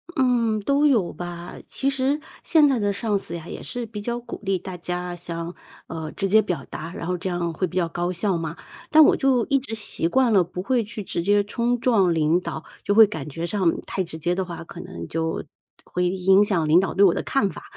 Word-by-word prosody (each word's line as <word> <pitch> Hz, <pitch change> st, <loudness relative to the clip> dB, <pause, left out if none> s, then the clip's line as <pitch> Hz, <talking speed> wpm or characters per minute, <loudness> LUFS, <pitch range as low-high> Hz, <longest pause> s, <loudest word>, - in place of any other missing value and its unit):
嗯， 235 Hz, -5 st, +2 dB
都 280 Hz, +7 st, +2 dB
有 220 Hz, -11 st, +2 dB
吧。 175 Hz, 0 st, -7 dB
其 275 Hz, -, -1 dB
实 275 Hz, +2 st, 0 dB, 0.2 s
现 310 Hz, -3 st, +5 dB
在 265 Hz, -4 st, +2 dB
的 205 Hz, -1 st, +1 dB
上 210 Hz, -1 st, 0 dB
司 170 Hz, -, -5 dB
呀 165 Hz, 0 st, -8 dB
也 -, -, -7 dB
是 245 Hz, -2 st, -5 dB
比 210 Hz, -1 st, -7 dB
较 235 Hz, +2 st, -2 dB
鼓 240 Hz, -, -8 dB
励 195 Hz, -1 st, +1 dB
大 185 Hz, 0 st, -7 dB
家 180 Hz, 0 st, -4 dB
像 170 Hz, 0 st, -6 dB, 0.3 s
呃， 160 Hz, -2 st, -5 dB
直 195 Hz, -, -1 dB
接 220 Hz, +2 st, +6 dB
表 180 Hz, -5 st, -3 dB
达， 165 Hz, +3 st, -6 dB
然 170 Hz, -, -6 dB
后 180 Hz, +1 st, -1 dB
这 185 Hz, +1 st, -3 dB
样 170 Hz, -1 st, -2 dB
会 185 Hz, +3 st, -1 dB
比 -, -, -11 dB
较 175 Hz, -2 st, +2 dB
高 175 Hz, +1 st, -2 dB
效 185 Hz, 0 st, 0 dB
嘛。 165 Hz, -1 st, -4 dB, 0.3 s
但 310 Hz, 0 st, +8 dB
我 -, -, +5 dB
就 260 Hz, -4 st, +2 dB
一 275 Hz, -2 st, +3 dB
直 240 Hz, -4 st, -6 dB
习 210 Hz, -6 st, -1 dB
惯 255 Hz, +4 st, +3 dB
了 190 Hz, -4 st, +5 dB
不 180 Hz, +1 st, -6 dB
会 245 Hz, +1 st, +1 dB
去 210 Hz, 0 st, -7 dB
直 170 Hz, -, -3 dB
接 205 Hz, +3 st, +3 dB
冲 235 Hz, +4 st, 0 dB
撞 210 Hz, -8 st, +3 dB
领 160 Hz, +1 st, +2 dB
导， 165 Hz, -3 st, -6 dB, 0.2 s
就 205 Hz, -, +1 dB
会 225 Hz, -, +10 dB
感 160 Hz, -9 st, -6 dB
觉 165 Hz, +4 st, -4 dB
上 185 Hz, -3 st, 0 dB
太 190 Hz, -, -2 dB
直 165 Hz, -2 st, -7 dB
接 175 Hz, +3 st, 0 dB
的 185 Hz, +1 st, -1 dB
话， 170 Hz, -2 st, -7 dB
可 170 Hz, -, -11 dB
能 185 Hz, +1 st, -7 dB
就 160 Hz, 0 st, -2 dB, 0.4 s
会 180 Hz, 0 st, -1 dB
影 190 Hz, +2 st, +4 dB
响 175 Hz, -6 st, +1 dB
领 160 Hz, +4 st, +6 dB
导 190 Hz, -, -1 dB
对 200 Hz, -, +4 dB
我 180 Hz, -, +5 dB
的 -, -, -2 dB
看 210 Hz, -8 st, +1 dB
法。 -, -, -9 dB
190 Hz, 255 characters per minute, -24 LUFS, 170-225 Hz, 0.4 s, 会